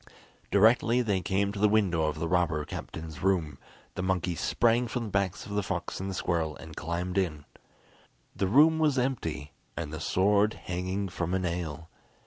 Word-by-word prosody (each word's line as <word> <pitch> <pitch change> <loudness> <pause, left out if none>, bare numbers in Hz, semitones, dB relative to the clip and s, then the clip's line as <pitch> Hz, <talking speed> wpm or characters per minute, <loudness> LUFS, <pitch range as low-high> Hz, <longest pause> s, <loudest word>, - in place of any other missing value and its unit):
Directly 115 +4 +4
they 100 -5 0
came 100 +2 0
to 100 - -6
the 105 +1 +4
window 95 -7 +2
of 75 0 -1
the 80 +1 -2
robber 85 -4 +1
captain's 80 +1 -7
room, 85 -7 0 0.3
the - - -4
monkey 90 -1 0
sprang 120 +7 +2
from 120 +1 -3
the 110 - -5
backs 95 -2 -1
of - - -9
the 105 0 0
fox 95 - -4
and 95 +1 -3
the 95 - -4
squirrel, 80 -4 -1
and 80 -1 -11
climbed 90 +4 -2
in. 75 -6 -2 0.9
The 95 - 0
room 155 +9 +5
was 150 -4 +2
empty, 80 - -2 0.3
and 80 -3 -4
the 80 - -4
sword 100 +5 +2
hanging 95 +2 -2
from 90 0 -2
a - - +1
nail. 85 -3 -3
95 Hz, 180 wpm, -29 LUFS, 80-105 Hz, 0.9 s, room